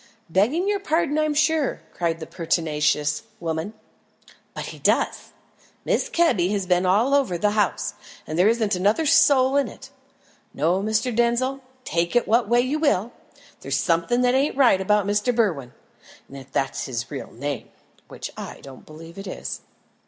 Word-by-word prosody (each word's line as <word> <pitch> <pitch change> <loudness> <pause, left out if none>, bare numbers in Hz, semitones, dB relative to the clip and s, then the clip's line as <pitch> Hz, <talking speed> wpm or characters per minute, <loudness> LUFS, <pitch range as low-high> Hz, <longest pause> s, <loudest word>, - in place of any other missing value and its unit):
"Begging 250 - +2
your 410 -1 +1
pardon, 320 -4 0
I'm 305 -1 0
sure," 310 -1 +1
cried 165 -2 -1
the 160 - -6
pertinacious 150 -3 0 0.2
woman, 165 +5 -4 0.8
"but - - -5
he - - -9
does. - - 0 0.6
Mrs. - - 0
Kebby 250 - +2
has 200 -2 -1
been 180 0 +2
all 220 +9 +3
over 270 -11 +2
the 205 +4 +1
house, 210 -1 0 0.3
and 155 - -5
there 180 +4 +4
isn't 220 -3 +1
another 205 - +1
soul 270 -2 +5
in 280 - +2
it. - - -12 0.6
No, 175 +5 +1
Mr. 220 +3 0
Denzil, 240 +3 +1 0.2
take 170 +5 -1
it 240 - +3
what 225 0 +2
way 240 +1 +4
you 270 +5 -1
will, 240 - +1 0.5
there's - - -2
something 170 +9 +1
that 250 0 +3
ain't 270 +2 +1
right 240 -9 +5
about 210 +1 +2
Mr. 210 +4 0
Berwin 165 - 0 0.6
if 135 -1 -11
that's 135 - -1
his 120 -3 -4
real - - -6
name, 140 +3 -5 0.4
which - - -7
I - - -8
don't 135 -2 -13
believe 165 +4 -11
it 195 - -8
is." - - -6
210 Hz, 165 wpm, -23 LUFS, 170-260 Hz, 0.8 s, soul